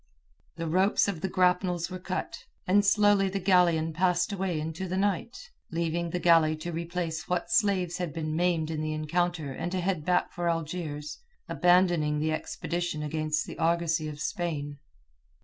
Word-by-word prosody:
The 165 - -4
ropes 185 +7 +3
of 185 -6 -3
the 190 - -1
grapnels 180 -1 +1
were 185 - -5
cut, 185 0 -5 0.2
and 200 +3 +4
slowly 205 -1 +4
the 195 - -3
galleon 175 -4 +3
passed 180 +3 +1
away 185 -4 -1
into 160 +4 -4
the 185 +1 -2
night, 205 - -2 0.2
leaving 170 +1 -1
the 180 - -2
galley 165 -3 +4
to 165 +3 -6
replace 170 -1 -4
what 180 +3 -1
slaves 195 -6 +2
had 180 -3 -3
been 155 -1 -3
maimed 165 -2 +1
in 155 -1 -3
the 155 0 -2
encounter 160 -1 -1
and 175 +6 -4
to 185 - 0
head 180 -3 -1
back 180 +2 +1
for 175 0 -1
Algiers, 155 -2 -4 0.3
abandoning 175 -4 +3
the 155 +1 0
expedition 170 0 -3
against 155 0 -1
the - - -9
argosy 165 -1 +1
of 150 -1 -7
Spain. 150 -3 -3
170 Hz, 165 wpm, -28 LUFS, 155-180 Hz, 0.3 s, and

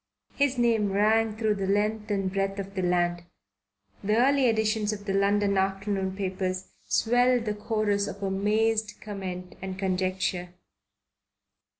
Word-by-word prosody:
His 280 -2 +1
name 225 -4 +2
rang 215 +1 +2
through 220 -1 +1
the 195 -2 -3
length 210 +2 0
and 195 -2 -1
breadth 195 0 -1
of 195 0 -6
the 190 - -2
land. 175 -1 +1 0.8
The 210 +2 +2
early 270 +2 +4
editions 220 -1 +1
of 205 -1 -6
the 195 - -1
London 200 0 +2
afternoon 195 0 -1
papers 185 -1 -3 0.2
swelled 245 +1 +3
the 210 - -1
chorus 210 -1 0
of 200 0 -7
amazed 215 +3 +1
comment 185 -3 -6
and 190 0 -5
conjecture. 185 -1 -1
200 Hz, 135 wpm, -27 LUFS, 190-220 Hz, 0.8 s, early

